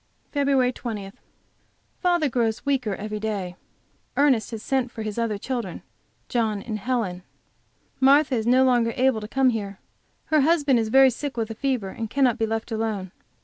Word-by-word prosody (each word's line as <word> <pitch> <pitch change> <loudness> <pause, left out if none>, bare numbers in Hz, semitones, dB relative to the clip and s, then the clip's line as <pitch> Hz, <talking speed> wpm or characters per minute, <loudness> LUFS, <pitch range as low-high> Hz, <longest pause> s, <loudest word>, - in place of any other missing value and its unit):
FEB. 275 -3 +2
20. 210 -6 -6 0.9
Father 350 -4 +2
grows 230 -3 -1
weaker 255 -8 0
every 210 +1 -5
day. 200 -5 -3 0.6
Ernest 270 -7 +3
has 225 -2 -7
sent 265 -3 0
for 225 -2 -7
his 215 +1 -4
other 225 -3 -1
children, 245 +2 -4 0.4
John 220 -4 0
and 215 -3 -4
Helen. 210 -6 -2 0.8
Martha 275 +2 +5
is 225 -2 0
no 255 +2 +5
longer 240 -3 +2
able 255 -3 +2
to 210 - -6
come 260 +2 +2
here; 200 -4 -4 0.6
her 305 - +6
husband 290 -4 +3
is 220 -1 -1
very 265 +2 +6
sick 275 +2 -5
with 225 -1 -2
a - - -3
fever, 245 -4 -1
and 225 +3 -5
cannot 255 -2 +2
be 225 - +1
left 225 +1 -3
alone. 215 -4 -2
235 Hz, 170 wpm, -24 LUFS, 215-265 Hz, 0.9 s, her